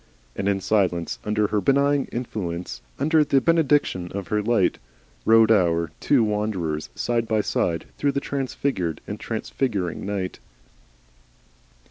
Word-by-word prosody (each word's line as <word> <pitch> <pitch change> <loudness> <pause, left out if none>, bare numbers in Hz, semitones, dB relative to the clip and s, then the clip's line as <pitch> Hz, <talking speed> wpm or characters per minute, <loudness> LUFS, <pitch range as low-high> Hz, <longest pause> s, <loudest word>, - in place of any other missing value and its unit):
And 100 - -1
in 100 -1 +1
silence 90 -5 0
under 105 0 +1
her 105 - +1
benign 140 +2 +2
influence, 90 - -4 0.2
under 155 +2 +3
the 140 -2 +3
benediction 145 - +2
of 100 -2 -5
her 105 0 +1
light, 110 -3 +1 0.5
rode 115 0 +6
our 85 -6 +2
two 135 -5 +3
wanderers 105 -8 -2
side 115 -1 -1
by 110 -1 +2
side 85 -4 -1
through 140 -1 +1
the - - 0
transfigured 135 - -2
and - - -6
transfiguring 100 -10 -2
night. 95 -2 -3
105 Hz, 130 wpm, -24 LUFS, 90-135 Hz, 0.5 s, rode